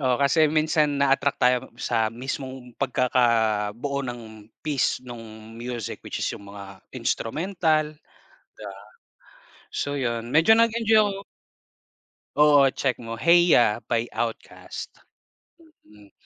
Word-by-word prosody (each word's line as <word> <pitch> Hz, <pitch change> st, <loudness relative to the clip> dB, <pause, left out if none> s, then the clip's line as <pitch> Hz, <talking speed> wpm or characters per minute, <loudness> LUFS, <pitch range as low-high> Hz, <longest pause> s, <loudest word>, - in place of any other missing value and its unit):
Oo 130 Hz, -3 st, +2 dB
kasi 150 Hz, +3 st, +3 dB
minsan 155 Hz, -1 st, +1 dB
na-attract 140 Hz, 0 st, +2 dB
tayo 125 Hz, 0 st, +3 dB, 0.2 s
sa 115 Hz, -2 st, 0 dB
mismong 130 Hz, +1 st, -7 dB
pagkakabuo 120 Hz, -1 st, +1 dB
ng 115 Hz, -4 st, -8 dB, 0.2 s
piece 140 Hz, -4 st, 0 dB
nung 115 Hz, -2 st, -11 dB
music, 120 Hz, -1 st, -6 dB
which -, -, -6 dB
is -, -, -1 dB
yung 100 Hz, 0 st, -10 dB
mga 100 Hz, -1 st, -11 dB, 0.2 s
instrumental, 155 Hz, -, -1 dB, 0.6 s
'di -, -, -18 dB
ba. 100 Hz, -2 st, -8 dB, 1.0 s
So 145 Hz, 0 st, -2 dB
yun, 120 Hz, -3 st, -2 dB
medyo 160 Hz, -, +5 dB
nag-enjoy 225 Hz, -1 st, +4 dB
ako 200 Hz, -1 st, -1 dB, 1.1 s
Oo 150 Hz, -1 st, +6 dB
check 135 Hz, -3 st, -1 dB
mo, 115 Hz, -1 st, -8 dB
Hey 170 Hz, +6 st, +5 dB
Ya! 110 Hz, -3 st, +4 dB
by 115 Hz, 0 st, -1 dB
OutKast. 115 Hz, 0 st, -5 dB, 1.0 s
Mm, 105 Hz, -1 st, -19 dB
125 Hz, 120 wpm, -24 LUFS, 115-150 Hz, 1.1 s, Oo